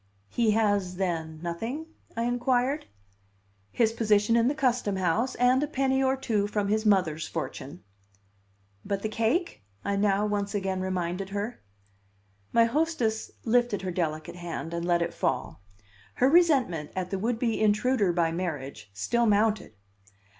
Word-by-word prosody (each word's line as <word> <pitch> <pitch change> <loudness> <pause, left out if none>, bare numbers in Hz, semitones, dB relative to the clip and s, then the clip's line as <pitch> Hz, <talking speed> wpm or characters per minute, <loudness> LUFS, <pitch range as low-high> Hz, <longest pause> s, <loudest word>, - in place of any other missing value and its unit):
"He 235 -2 +1
has, 205 -4 +1
then, 165 -4 -2
nothing?" 225 - -4 0.3
I 230 - +1
inquired. 245 +3 0 0.8
"His 225 -1 +2
position 215 -1 +3
in 235 0 +4
the 285 - +1
Custom 250 -8 +1
House, 190 +8 0
and 250 +2 +3
a 295 - 0
penny 270 -2 +1
or 265 0 +2
two 215 -6 0
from 205 -1 -1
his 215 +1 +1
mother's 165 -6 +2
fortune." 160 0 -6 1.0
"But 200 -1 -3
the 215 - -1
cake?" 230 - 0 0.2
I 200 - 0
now 200 0 +2
once 205 0 -2
again 190 -2 -1
reminded 185 0 -2
her. 205 +4 -4 0.9
My 230 0 +5
hostess 245 -5 0 0.2
lifted 240 -3 +2
her 185 - -2
delicate 170 0 -3
hand 170 -1 -5
and 170 0 -2
let 175 -1 +2
it 170 - -4
fall. - - -2 0.5
Her 260 +2 +3
resentment 270 - +3
at 185 -1 -3
the 195 - -1
would 225 +3 0
be 230 -2 0
intruder 215 -1 +3
by 170 -1 +1
marriage 140 - -4
still 235 - +1
mounted. 210 - +2
210 Hz, 150 wpm, -27 LUFS, 180-240 Hz, 1.0 s, My